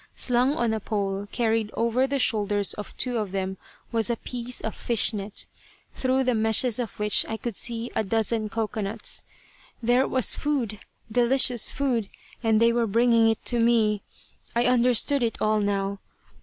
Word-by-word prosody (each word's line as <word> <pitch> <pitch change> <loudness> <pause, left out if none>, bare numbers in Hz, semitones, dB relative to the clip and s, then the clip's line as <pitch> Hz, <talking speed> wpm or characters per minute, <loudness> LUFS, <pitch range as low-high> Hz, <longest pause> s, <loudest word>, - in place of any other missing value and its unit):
Slung 250 +3 +2
on 235 -6 0
a 220 - -1
pole 200 -1 -3
carried 225 -2 0
over 235 +3 +1
the 280 +1 -1
shoulders 205 -5 0
of 210 - -9
two 250 -2 -1
of 210 -3 -4
them 190 0 -3 0.3
was 225 0 0
a 235 - +1
piece 245 +1 -4
of 220 - -3
fish 235 -1 +1
net, 200 0 -4 0.5
through 260 0 0
the 250 -1 +1
meshes 220 +2 +3
of 235 -4 -5
which 210 0 +4
I 220 - -3
could 235 -2 -5
see 235 +2 -2
a - - +1
dozen 220 +1 -1
cocoanuts. 215 -1 -1 0.6
There 245 +3 +3
was 260 -3 +2
food; 245 -8 -2 0.3
delicious 245 0 +3
food! 245 -7 -1 0.3
And 220 -2 +2
they 230 0 +4
were 235 -1 +1
bringing 230 +1 +3
it 225 - -2
to 240 - +1
me! 225 -3 +2 0.5
I 235 - +3
understood 250 +2 +3
it 230 -2 -1
all 215 0 +1
now. 200 -1 -1
230 Hz, 170 wpm, -25 LUFS, 210-245 Hz, 0.6 s, which